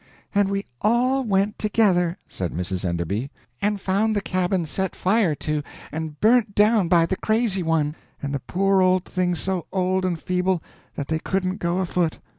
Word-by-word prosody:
"And 200 -1 +3
we 200 0 -2 0.2
all 250 +4 +2
went 200 -2 0
together," 190 -5 +2
said 90 -3 -4
Mrs. 90 +1 -3
Enderby. 90 - -2 0.3
"And 205 0 +1
found 205 +3 +1
the 205 - +1
cabin 185 -2 0
set 190 +4 -2
fire 190 -4 +2
to 150 0 -2 0.3
and 160 -1 -5
burnt 220 -2 +3
down 210 -2 +4
by 165 -1 +4
the 190 +2 -2
crazy 220 -3 +1
one, 160 -3 0 0.2
and 140 0 -4
the 140 - -1
poor 195 +6 +1
old 185 0 +3
things 180 -2 -1
so 190 -3 -2
old 185 0 +1
and 180 -3 -1
feeble 180 -1 0 0.3
that 140 - -4
they 160 0 -1
couldn't 185 +2 -1
go 175 -2 -1
afoot. 175 -3 0
185 Hz, 175 wpm, -23 LUFS, 165-200 Hz, 0.3 s, down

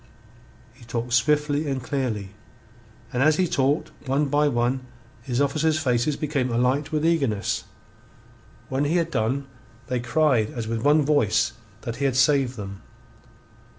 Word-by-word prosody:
He 125 0 -18
talked 115 +1 -4
swiftly 150 +3 +2
and 135 -2 -2
clearly, 125 -8 -2 0.8
and 125 - 0
as 155 +2 +5
he 185 - +2
talked 145 -3 0 0.2
one 140 +2 +1
by 145 +1 +3
one 120 0 +1 0.4
his 120 +1 -2
officers' 155 +3 +2
faces 130 -1 +1
became 140 -4 -1
alight 130 +6 +1
with 155 0 0
eagerness. 135 -12 0 1.0
When 135 +2 0
he 155 +4 +1
had 170 -1 +1
done, 130 +3 0 0.4
they 125 -1 0
cried 125 -3 +2
as 115 -2 -4
with 115 0 -2
one 150 +3 +4
voice 145 -8 +2 0.3
that 115 -2 -5
he 140 - -1
had 135 -2 +1
saved 135 -2 +3
them. 100 -2 -7
135 Hz, 150 wpm, -24 LUFS, 120-150 Hz, 1.0 s, as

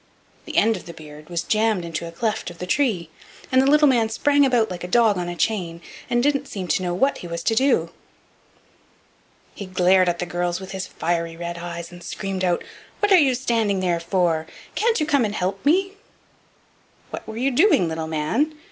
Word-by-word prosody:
The - - -5
end 225 +1 +4
of - - -12
the 170 - -9
beard 150 0 -12
was 170 -1 -2
jammed 215 -2 +1
into 170 0 -4
a - - -8
cleft 215 +4 -2
of 175 - -12
the 180 - -5
tree, 185 - 0 0.4
and 260 0 +5
the 270 - +3
little 300 +1 +6
man 235 -5 +3
sprang 285 +5 +3
about 235 -5 +2
like 175 -1 -6
a - - -4
dog 220 +1 +4
on 175 -1 -3
a 175 - -5
chain, 175 -3 -1 0.3
and 240 0 +1
didn't 280 -1 +1
seem 190 -3 -5
to 155 - +1
know 175 -1 -2
what 270 +10 +1
he 175 - -8
was 170 0 -5
to 225 - +1
do. 265 +4 +2 1.6
He 200 - -8
glared 185 0 +3
at 175 - -1
the 180 - -3
girls 175 0 -2
with 190 0 -9
his 190 -1 -4
fiery 165 -1 -2
red 170 0 -5
eyes, 170 0 -6
and 175 0 -12
screamed 190 +1 -4
out: 175 -1 +1 0.4
"What 415 0 +1
are 380 - +8
you 270 -5 +3
standing 230 -6 0
there 175 -2 0
for? 170 -2 0 0.3
Can't 455 -1 +1
you 305 - +1
come 285 -4 +2
and 210 -1 -2
help 195 +1 -2
me?" 380 +7 +2 1.2
"What - - -7
were 220 0 -7
you 265 +3 +1
doing, 265 - +4
little 160 0 -3
man?" 190 - -1
190 Hz, 210 wpm, -22 LUFS, 175-245 Hz, 1.6 s, are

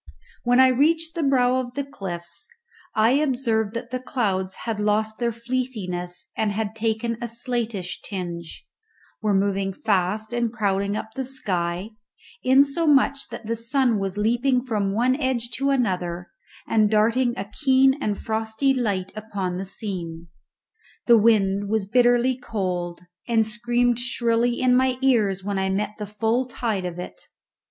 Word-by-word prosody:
When 245 +1 +3
I 260 0 +7
reached 320 +5 +2
the 335 - -2
brow 255 -3 +3
of 250 -1 -4
the 280 - -1
cliffs 175 -9 -7 0.5
I 220 +2 +4
observed 245 -6 +1
that 235 +1 -5
the 255 - -2
clouds 195 -8 -1
had 225 -2 -2
lost 215 +1 0
their 235 -1 +1
fleeciness 225 -8 -3
and 215 -1 0 0.2
taken 225 +1 -1
a 240 - -2
slatish 230 -6 -3
tinge, 175 -4 -6 0.6
were 210 -2 +1
moving 195 0 +1
fast 210 +2 0
and 240 -1 0
crowding 200 -2 0
up 220 0 -6
the 265 - -3
sky, 185 -6 -2 0.5
insomuch 280 +1 +3
that 230 - -8
the 230 +2 -1
sun 230 -1 +1
was 195 0 -3
leaping 245 +4 +1
from 210 -5 0
one 245 +5 +2
edge 250 -3 -1
to 275 +1 +1
another 180 -9 -1 0.4
and 215 -2 +3
darting 230 +3 +2
a 195 - -3 0.2
keen 265 -1 +5
and 205 -2 -1
frosty 220 +5 0
light 200 -7 -1
upon 200 -4 -4
the 195 - -4
scene. 170 -5 -5 0.8
The 235 - +7
wind 200 -2 +3
was 220 -2 +1
bitterly 245 +3 +3
cold, 180 -7 -3 0.3
and 225 -2 +3
screamed 240 +2 +1
shrilly 240 -1 +1
in 250 -1 +4
my 255 0 +2
ears 210 -8 +2
when 200 0 -2
I 190 0 0
met 200 +2 -1
the 210 - -4
full 225 +5 0
tide 225 -6 -2
of 175 -1 -5
it. 180 - -8
225 Hz, 150 wpm, -24 LUFS, 195-250 Hz, 0.8 s, I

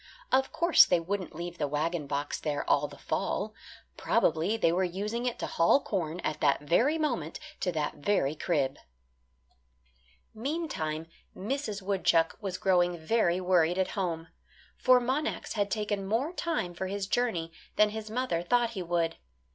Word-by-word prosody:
Of 265 0 +3
course 340 0 +6
they 175 - +2
wouldn't 185 0 -4
leave 175 +1 -6
the 145 - +1
wagon 150 +1 -1
box 145 +1 -2
there 145 -2 -2
all 145 +1 +3
the - - -13
fall. - - -2 0.4
Probably 175 +8 +1
they 165 -7 +3
were 180 +2 +1
using 210 +7 -2
it 245 - -2
to - - -3
haul 170 +11 +4
corn, 175 - -3
at 155 -2 -3
that 140 -2 +3
very 235 - +2
moment, 240 - -2 0.2
to 180 - 0
that 150 -1 -2
very 150 -3 +1
crib. 145 -4 -1 1.5
Meantime 225 - -3 0.3
Mrs. 215 -2 -3
Woodchuck 180 -4 +2
was 190 -3 -3
growing 180 -2 +2
very 175 +1 +1
worried 180 -2 +3
at 190 0 +1
home 170 -5 -3 0.5
for 255 -1 +5
Monax 265 +5 -2
had 205 -2 0
taken 205 -2 -2
more 250 - 0
time 325 - -2
for 190 +2 -4
his 200 +1 -3
journey 195 -7 0 0.2
than 210 0 +4
his 220 0 -6
mother 225 -7 -1
thought 235 +6 +2
he 200 -5 -4
would. 170 -1 0
185 Hz, 160 wpm, -29 LUFS, 165-225 Hz, 1.5 s, course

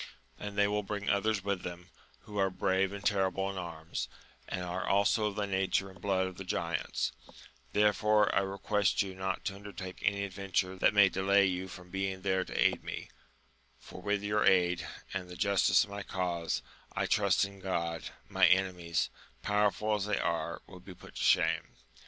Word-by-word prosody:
and 105 -1 -6
they 100 0 +5
will 105 0 0
bring 100 0 -2
others 100 0 +1
with 100 -2 -1
them, 90 0 -8 0.3
who 105 -2 -6
are 95 0 +3
brave 95 +1 +1
and 100 0 -7
terrible 95 -1 +1
in - - -8
anns, 85 -2 -5 0.4
and 90 - -3
are 90 +1 -3
also 100 +2 +3
of 105 - -4
the 105 -1 0
nature 95 0 0
and 90 -2 -17
blood 95 -2 +1
of 95 -1 -6
the 95 - -6
giants: 85 -2 -1 0.6
therefore, 105 0 +4
I - - +4
request 100 +1 +1
you 95 -1 -6
not 95 0 -3
to 100 - -1
undertake 100 -2 -8
any 100 0 +1
adventure 95 -1 -1
that 95 - +3
may 100 -1 +8
delay 100 +1 +3
you 95 0 -1
from 90 -1 -11
being 95 -1 -2
there 95 -1 +1
to - - -5
aid - - +3
me, - - -6 0.7
for 90 - -11
with 100 +1 0
your 105 0 +1
aid, 90 -3 +3 0.3
and 90 -2 -4
the 90 - -8
justice 100 -1 +4
of 100 - -10
my 100 0 -4
cause, 90 -3 -2 0.3
I - - 0
trust 100 -2 +3
in 100 -1 -11
Q 95 - -5
od, 85 -2 -1 0.2
my - - +4
enemies, 90 -3 +1 0.3
power 105 +1 +3
ful 105 +3 -2
as 105 -2 0
they 105 - +1
are, 85 0 -2
will 90 - -12
be 90 +1 -11
put - - -14
to - - -6
shame. - - +2
95 Hz, 195 wpm, -31 LUFS, 90-100 Hz, 0.7 s, may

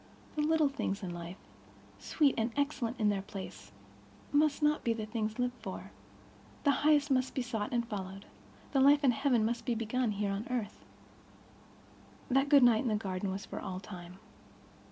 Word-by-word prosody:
The 305 - 0
little 310 0 +3
things 220 -7 -3
of 180 - -3
life, 175 +2 -7 0.6
sweet 290 -5 +2
and 225 +1 0
excellent 270 -4 -1
in 210 -1 +3
their 200 -2 0
place, 195 0 -9 0.6
must 295 +1 +2
not 300 0 +2
be 230 - +2
the 220 -1 -4
things 215 -1 -3
lived 245 0 0
for; - - -7 0.7
the 285 - +5
highest 295 -1 +4
must 255 -1 +1
be 260 - 0
sought 220 -4 -3
and 235 -1 0
followed; 195 -2 -6 0.5
the 275 - +2
life 285 +2 +6
of 265 - +6
heaven 250 -3 +2
must 230 +1 -1
be 240 -1 0
begun 230 +1 0
here 200 0 -1
on 200 +4 -3
earth. 235 -4 -3 1.5
That 270 +2 +3
good 280 -3 +7
night 230 -2 +6
in 260 - -2
the 215 - +2
garden 195 -2 -2
was 195 +1 -4
for - - -6
all 185 0 -5
time. 180 -2 -10
235 Hz, 180 wpm, -32 LUFS, 205-275 Hz, 1.5 s, good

